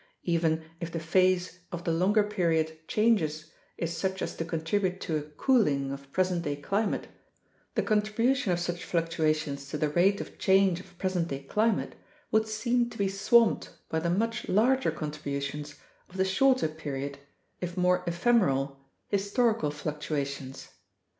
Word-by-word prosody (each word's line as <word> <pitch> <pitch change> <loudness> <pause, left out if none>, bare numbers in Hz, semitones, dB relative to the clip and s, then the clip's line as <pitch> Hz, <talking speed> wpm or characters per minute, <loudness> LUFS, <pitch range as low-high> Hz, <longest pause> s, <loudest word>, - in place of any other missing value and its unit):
Even 165 -2 +1 0.2
if 170 -1 -5
the 165 - -3
phase 185 +2 +2
of 175 -1 -5
the 165 - 0
longer 195 +6 +3
period 165 -6 0
changes 160 -9 +1 0.3
is 170 0 -2
such 190 +3 -2
as - - -4
to - - -2
contribute 180 +3 -1
to 160 - -2
a 150 - 0
cooling 150 - +1
of 140 0 -8
present 185 0 +1
day 145 -3 -2
climate, 200 +9 -1 0.7
the - - +2
contribution 220 +3 +1
of 175 - +1
such 175 0 -3
fluctuations 155 -4 -1
to 150 - -3
the 150 0 +1
rate 190 +6 +3
of - - -8
change 190 -2 +4
of 185 -1 -15
present 185 -3 0
day 140 -3 -5
climate 215 +8 +1 0.4
would 220 0 +3
seem 235 +2 +1
to 235 - -11
be 200 - +1
swamped 220 +4 +3 0.2
by 160 - 0
the 170 +1 -1
much 230 +6 -1
larger 255 +7 +3
contributions 150 -1 -4 0.3
of 185 - -11
the 190 - +3
shorter 255 +4 +3
period 140 -3 -5 0.4
(if 180 0 -5
more 180 0 +3
ephemeral) 170 - +2 0.3
historical 205 - +1
fluctuations. 145 -2 -4
175 Hz, 155 wpm, -29 LUFS, 155-205 Hz, 0.7 s, change